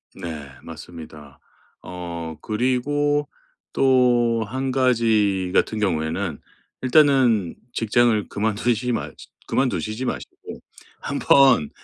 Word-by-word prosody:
네 80 -6 -7
맞습니다. 75 -3 -11 0.4
어 85 -3 -7
그리고 145 +6 0 0.5
또 120 -3 +3
1 130 +5 -3
가지 110 -7 +1
같은 110 - +1
경우에는 80 -3 -2 0.4
일단은 130 - +3 0.2
직장을 115 -1 +1
그만두시지 110 +3 -1
마 115 - -2 0.4
그만두시지 125 -2 -1
마시고 - - -7 0.4
한번 135 - +3
110 Hz, 205 characters per minute, -22 LUFS, 90-125 Hz, 0.5 s, 또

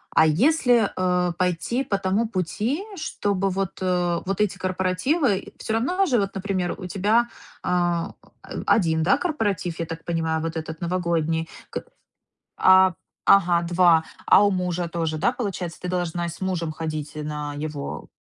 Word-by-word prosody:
а 160 - +6
если, 240 - +3
э, 180 -1 +1
пойти 180 +8 0
по 200 - -1
тому 195 +4 0
пути, 215 - -2
чтобы 195 -9 -1
вот, 190 -1 -3
э, 180 -2 +1
вот 195 +2 -1
эти 200 -2 +1
корпоративы 190 - 0
всё 220 - -3
равно 355 - +1
же, 255 -9 +2
вот, 195 -1 -2
например, 190 -2 -2
у - - -6
тебя, 210 +7 +2 0.3
а, 175 -1 0 0.5
1, 160 -6 +3
да, 195 +8 +4
корпоратив, 205 - -2
я 165 - -1
так 165 0 -7
понимаю, 160 -2 -1
вот 165 0 -3
этот 160 0 -6
новогодний, 170 -2 0 0.2
к - - -4 0.7
А, 185 0 +6 0.3
ага, 175 -3 +5
2, 170 -1 +4 0.2
а 205 - +6
у 200 - +3
мужа 180 -2 -1
тоже, 165 -2 -2
да, 195 +8 +2
получается, 190 -8 -4
ты 180 - -4
должна 175 -1 -1
и - - -3
с 170 - -9
мужем 180 -4 -1
ходить 155 -2 -5
на 150 -1 -4
его. 150 -1 -5
180 Hz, 160 wpm, -24 LUFS, 165-200 Hz, 0.7 s, а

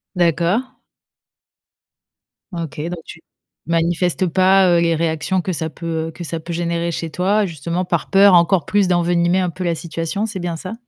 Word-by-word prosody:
D'accord. 180 - +1 1.8
Ok, 165 -4 -6
donc 175 +2 -4
tu 165 - -11 0.5
manifestes 170 +2 +1
pas, 185 +2 +4
heu, - - +4
les 165 -1 +2
réactions 160 +3 -1
que 185 - -3
ça 160 -1 -3
peut, 165 -1 -4
heu, - - -6
que 175 - -9
ça 165 0 -4
peut 165 +2 -8
générer 170 0 -1
chez 165 -1 -4
toi, 200 +3 +1
justement, 170 +2 -3
par 170 -2 -2
peur 195 0 +6
encore 170 -1 +4
plus 200 +1 +2
d'envenimer 175 0 +2
un 180 -2 0
peu 185 +2 -6
la 170 -2 0
situation, 165 +5 -3
c'est 210 -4 -5
bien 175 -2 -3
ça? 185 +6 -7
170 Hz, 175 wpm, -19 LUFS, 165-185 Hz, 1.8 s, peur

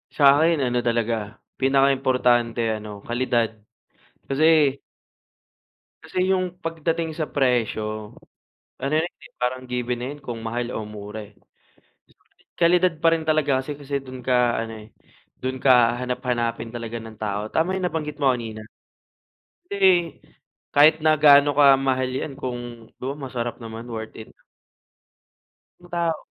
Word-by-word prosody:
Sa'kin 150 +3 +5
ano 125 -1 +1
talaga, 115 -2 -1 0.2
pinakaimportante 130 -3 +2 0.2
ano, 105 -1 -9
kalidad. 120 -1 0 0.8
Kasi 150 -1 +4 1.3
Kasi 185 +1 -1
'yung 185 -2 +1
pagdating 165 -1 -2
sa 155 - -1
presyo, 110 -5 -1 0.6
ano 140 +2 -3
'yan 160 +2 +2
eh, - - -18
parang 130 +1 -1
given 125 -1 -2
na 120 - -4
'yan 145 - -14
kung 120 -4 -6
mahal 120 +1 -2
o 110 - -4
mura 105 0 -8
eh. - - -26 1.3
Kalidad 175 0 +3
pa 165 - +6
rin 160 -1 -5
talaga 150 -4 +2
kasi 145 +2 -5
kasi 140 -1 -3
do'n 130 -1 -9
ka 125 -2 +3
ano 110 -1 -9
eh, - - -17 0.5
do'n 130 0 -3
ka 125 -3 +5
hahanap-hanapin 120 -2 -2
talaga 115 -1 -5
ng 110 -1 -11
tao. 105 -1 -2
Tama 175 +4 +1
'yung 190 - -4
nabanggit 150 -3 -4
mo 135 -2 +5
kanina. 115 -3 -5 1.1
Kasi, 200 - -5 1.0
kahit 155 +2 +6
na 155 0 +5
gaano 145 -1 +6
kamahal 135 -2 +4
'yan 130 +3 -4
kung 120 -3 -6
though 135 +3 -4
masarap 125 -4 -4
naman 115 0 -8
worth 110 -1 -6
it. 110 - -10 1.5
'Yung 175 0 -17
tao 170 -2 0
130 Hz, 135 wpm, -23 LUFS, 115-150 Hz, 1.5 s, pa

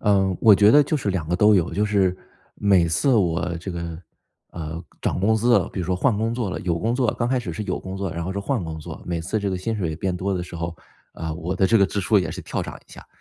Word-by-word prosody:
嗯， 95 -3 +2
我 110 -3 +8
觉 105 +2 +6
得 145 +5 +7
就 155 +2 -1
是 105 -8 -2
2 90 -5 -2
个 90 - +1
都 105 +1 +5
有， 85 -3 +1
就 105 - +1
是 95 -3 +2 0.4
每 95 -4 +3
次 130 - +2
我 90 -4 +1
这 90 +3 -6
个， 85 -1 -5 0.5
呃， 80 0 -6 0.2
涨 - - -1
工 110 +4 +3
资 120 +2 +4
了， - - -2
比 - - -7
如 85 - -3
说 90 - +1
换 105 +4 +1
工 115 +2 -1
作 120 -5 -2
了， - - -3
有 85 -2 -1
工 115 +6 0
作 125 -4 +1
刚 120 0 0
开 130 - +1
始 105 -8 -5
是 105 - -4
有 - - -2
工 95 0 -7
作， 95 -2 -3
然 85 0 -4
后 95 - -3
是 100 - -3
换 115 0 -1
工 80 -1 -5
作， 80 +1 -8
每 85 -1 -2
次 85 +7 -2
这 100 -1 -2
个 95 - -1
薪 110 +5 -2
水 85 -6 -2
变 90 +1 -2
多 95 +2 -1
的 90 - -2
时 90 -1 -8
候， 85 0 -4 0.4
啊， 80 -1 -5
我 85 +3 -3
的 95 - +3
这 115 +1 +4
个 100 - +5
支 100 - -2
出 105 +2 +3
也 90 - -1
是 - - -6
跳 - - -3
涨 - - -7
一 - - -24
下。 - - -12
95 Hz, 310 characters per minute, -23 LUFS, 85-105 Hz, 0.5 s, 我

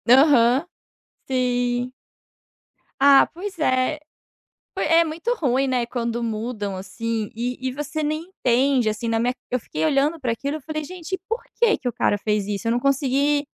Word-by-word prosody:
Aham, 265 0 +5 0.6
sim. 245 -1 0 1.1
Ah, 275 0 +6
pois 370 +1 -7
é, 260 +1 +1 0.8
foi - - 0
é 330 +1 +5
muito 330 +10 -2
ruim, 270 - +1
né, 250 -2 0
quando 235 -1 -3
mudam 215 -3 -3
assim, 215 +3 -4
e 245 +2 -3
e - - -3
você 295 +3 -4
nem 310 +2 -1
entende, 255 -7 +2
assim, 220 +2 -3
na 225 0 +1
minha 245 +2 +1 0.2
eu 250 - +1
fiquei 160 -7 -4
olhando 290 - +2
para 245 -3 -1
aquilo, 280 +6 -3
eu - - -16
falei: 310 +1 -4
"Gente, 365 +2 -5
por 460 +2 -2 0.2
que 460 -2 +4
que 250 - -3
o - - -3
cara 205 - +1
fez 210 -1 -1
isso?", 205 +1 -3
eu - - +2
não 240 - +1
consegui 275 +2 +1
255 Hz, 170 wpm, -23 LUFS, 235-300 Hz, 1.1 s, Ah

